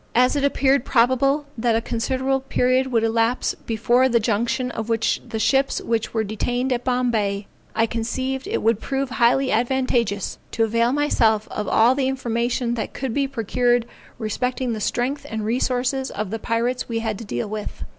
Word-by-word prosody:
As 250 +4 +4
it 285 - 0
appeared 275 -2 +3
probable 270 +4 +2
that 230 -1 +1
a - - +3
considerable 260 +4 -1
period 260 0 +1
would 230 -2 +2
elapse 225 +2 +1
before 240 +3 +3
the 235 -1 +3
junction 235 +3 0
of 225 -1 -5
the 225 0 -1
ships 270 +4 +2
which 230 -1 -1
were 220 -1 0
detained 245 +5 -1
at 245 0 -3
Bombay, 225 -6 0 0.3
I 225 - +3
conceived 260 +4 -3
it - - -2
would 225 -1 +3
prove 270 0 -2
highly 255 +2 +3
advantageous 235 -4 0
to 225 - +2
avail 230 +2 +2
myself 230 -7 +2
of 210 - -3
all 230 +5 +5
the 265 -1 0
information 240 -2 -1
that 230 - -4
could 260 -3 -3
be 280 +1 +1
procured 245 -1 +1 0.3
respecting 250 +3 -2
the 220 - -4
strength 255 +7 -1
and 220 -1 -3
resources 255 +3 0
of 210 -2 -4
the 225 - -3
pirates 235 +3 -1
we 230 - -1
had 225 -3 -2
to - - -6
deal 120 - -3
with. 210 0 -6
240 Hz, 175 wpm, -22 LUFS, 225-260 Hz, 0.3 s, all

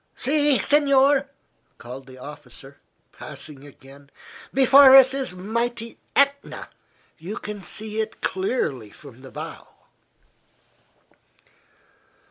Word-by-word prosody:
"See, 290 0 +1
signore!" 280 -1 +3 0.5
called 125 +3 -10
the 130 -1 -13
officer, 140 0 -12 0.3
passing 140 -1 -10
again; 140 0 -17 0.4
"before 270 +1 +7
us 265 -1 +7
is 270 -7 -3
mighty 230 +4 -4 0.2
Etna 280 0 0 0.5
you 180 +7 -7
can 210 -1 -7
see 215 +3 -4
it 220 0 -7
clearly 170 - -2
from 130 +2 -15
the 135 - -12
bow." - - -9
210 Hz, 100 wpm, -23 LUFS, -, 0.5 s, before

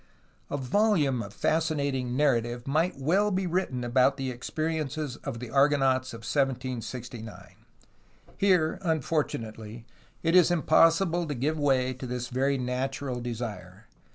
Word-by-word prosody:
A 145 - -2
volume 145 - +2
of 100 -2 -7
fascinating 140 -5 0
narrative 120 -4 +1
might 160 +5 +1
well 180 +10 +2
be 190 -1 -1
written 170 -8 -1
of 130 +3 +3
the 135 -2 -3
experiences 155 +1 -3
of - - -6
the 120 -2 -7
Argonauts 135 -2 +3
of 115 - -9
1769. 125 -3 -3 0.9
Here, 180 -4 +2
un 160 -4 0
fortunately, 115 -6 -3 0.4
it 165 +1 +2
is 180 -2 +7
impossible 165 +1 +3
to 145 - -3
give 150 +5 -1
way 130 -3 +2
to 130 0 -7
this 125 0 -4
very 135 +2 +1
natural 130 0 -3
desire. 110 -5 -6
135 Hz, 130 wpm, -28 LUFS, 125-155 Hz, 0.9 s, is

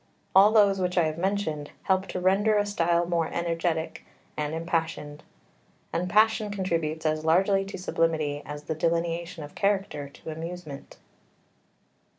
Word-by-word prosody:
All 195 +3 +7
those 200 -3 +4
which 180 0 -1
I 175 - +5
have 155 +1 -2
mentioned 180 -6 -1
help 190 0 +1
to - - -4
render 200 +4 +3
a 205 - +2
style 170 -4 +1
more 170 -1 0
energetic 165 -1 -2 0.3
and 150 +1 -2
impassioned; 165 -3 -3 0.7
and 180 +2 -1
passion 215 +2 +3
contributes 165 -5 -2
as 155 0 0
largely 190 +5 +3
to 195 - -7
sublimity 160 -5 0
as 150 0 -7
the 160 - -3
delineation 170 +1 -1
of 145 - -10
character 195 -8 -1
to 160 - -9
amusement. 160 -2 -8
170 Hz, 145 wpm, -27 LUFS, 160-195 Hz, 0.7 s, All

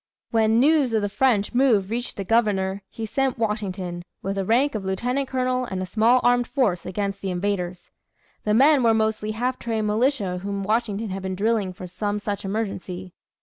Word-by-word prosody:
When 225 0 +3
news 280 -3 +3
of 215 - +1
the 205 - 0
French 220 -2 +1
move 230 -6 +3
reached 240 +1 -3
the 200 - -2
Governor, 200 -3 +1
he 225 - -5
sent 265 +4 0
Washington, 190 -6 -3 0.2
with 195 - -1
the 195 - -1
rank 245 +8 +2
of 215 -3 -3
lieutenant 245 +8 -1
colonel, 255 -1 0
and 190 -5 -4
a 185 - -2
small 225 +6 +3
armed 245 0 +3
force 215 -11 0
against 200 +1 -3
the 195 - -3
invaders. 180 -1 -3 0.5
The 210 0 +2
men 280 +3 +6
were 230 -2 +4
mostly 220 -1 0
half 245 +4 -2
trained 225 -2 -2
militia 210 -4 +1
whom 200 +1 -3
Washington 215 0 -1
had 190 +1 -4
been 190 0 -3
drilling 210 -1 +1
for 185 0 -9
some 205 +3 -3
such 205 -1 -4
emergency. 190 -3 -4
215 Hz, 190 wpm, -24 LUFS, 195-240 Hz, 0.5 s, men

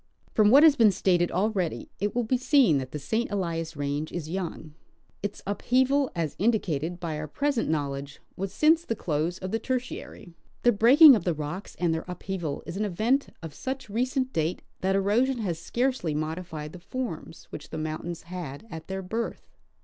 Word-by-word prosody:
From 210 -1 +5
what 275 +6 +8
has 315 -3 +8
been 225 -6 +6
stated 175 -2 +2
already, 190 -2 -1
it 205 +3 -1
will 245 - +2
be 235 +3 +1
seen 250 - +4
that 130 -1 -5
the 150 - -5
St. 220 - -1
Elias 165 -5 -3
range 145 +2 -2
is 160 -2 -5
young. 170 -4 -5 0.5
Its 205 0 -5
upheaval, 260 +7 +2
as 165 -4 -2
indicated 175 -6 0
by 160 -3 -3
our 155 - -4
present 280 - 0
knowledge, 140 -2 -3 0.2
was 195 0 -4
since 315 +8 +4
the 230 - -2
close 165 0 -1
of 185 0 -5
the 225 - 0
Tertiary. 255 -8 -5 0.3
The 240 - +6
breaking 260 +7 +8
of 215 - -2
the 175 -3 0
rocks 155 +6 -6
and 170 -2 +1
their 160 - -3
upheaval 180 -4 -4
is 170 +2 -6
an 210 - 0
event 225 +9 +1 0.2
of 160 -3 -7
such 265 -4 -5
recent 255 +3 0
date 160 +2 -1 0.2
that 190 +1 +1
erosion 225 +7 +2
has 180 -8 -2
scarcel}^ 240 - -1
modified 155 0 -4
the 180 - -9
forms 205 -5 -6
which 150 - -8
the - - -6
mountains 155 +2 -4
had 170 -2 -7
at 160 -1 -8
their 190 0 -4
birth. 225 +5 -4
185 Hz, 185 wpm, -27 LUFS, 160-235 Hz, 0.5 s, what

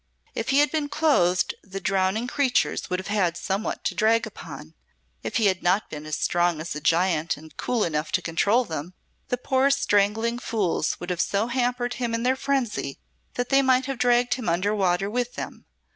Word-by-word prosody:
If 225 - -3
he 270 - +3
had 295 - +2
been 300 -2 -1
clothed 180 - +2
the 195 0 -7
drowning 190 +4 0
creatures 260 0 0
would 180 - 0
have 185 - -7
had 190 -5 0
somewhat 200 +2 -3
to - - -1
drag 225 +1 +3
upon 160 -7 -10 0.5
if - - -5
he 225 - +3
had 185 -2 +2
not 185 +4 +1
been 150 0 -7
as 155 - -2
strong 175 -2 +1
as 160 0 -5
a 150 - -5
giant 165 -1 +1
and 155 +1 -14
cool 240 -4 0
enough 155 -1 -2
to - - +2
control 205 +9 +2
them, 165 0 -6 0.3
the 250 - -1
poor 265 +2 +2
strangling 225 -2 +2
fools 200 -10 -1
would 175 +1 -4
have 180 - 0
so 200 +2 0
hampered 245 0 -1
him 235 -2 0
in 230 - -2
their 255 +1 +3
frenzy 260 - -2 0.4
that 245 0 -2
they 275 0 +5
might 260 -1 +3
have 270 -3 -4
dragged 245 0 +3
him 250 -8 -3
under 185 +5 +1
water 190 -2 +1
with 245 +3 -2
them. - - -7
205 Hz, 200 wpm, -25 LUFS, 175-245 Hz, 0.5 s, they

